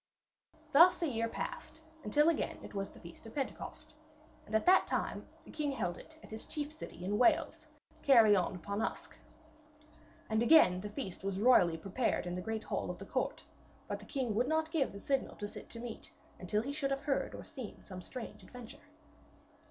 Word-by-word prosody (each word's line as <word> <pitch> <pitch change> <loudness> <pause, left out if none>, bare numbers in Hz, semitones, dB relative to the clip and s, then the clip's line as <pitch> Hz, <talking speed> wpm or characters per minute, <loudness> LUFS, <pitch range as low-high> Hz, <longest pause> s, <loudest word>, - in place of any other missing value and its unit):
Thus 340 +4 +7
a - - +2
year 230 -4 -1
passed, 320 - -6 0.2
until 295 +8 +3
again 335 -2 +1
it - - -10
was 195 -1 -3
the - - -15
feast 170 +6 -12
of 225 - -12
Pentecost, 275 -2 -5 0.5
and 215 - -3
at 220 - +2
that 370 +1 +6
time - - -2 0.2
the - - -12
king 295 -2 -1
held 175 -9 -2
it 315 - -13
at - - -13
his 220 - -6
chief 295 0 -4
city 310 - -8
in 205 +3 0
Wales, 250 - +3 0.3
Caerleon 215 -9 +5
upon 200 +4 -3
Usk. - - -4 1.1
And 220 0 +1
again 235 - +6
the 210 - -5
feast 205 -5 -6
was 195 -1 -2
royally 200 -8 +5
prepared 195 +6 -1
in 175 - -3
the 180 - -3
great 220 +3 -3
hall - - -2
of - - -4
the - - -8
court, - - -2 0.4
but - - -3
the - - -12
king 260 -6 -1
would 240 +4 +1
not 315 +1 0
give 310 -5 +1
the 200 - -9
signal 270 +5 -1
to 205 - -5
sit - - -10
to 230 - -8
meat 235 -1 -7 0.3
until 210 +4 0
he 275 - -3
should 285 -2 -1
have 275 0 -1
heard 280 -2 -1
or - - -8
seen 260 -9 -9
some 185 -2 -8
strange 250 +5 -8
adventure. 245 -2 -11
230 Hz, 200 wpm, -34 LUFS, 200-280 Hz, 1.1 s, Thus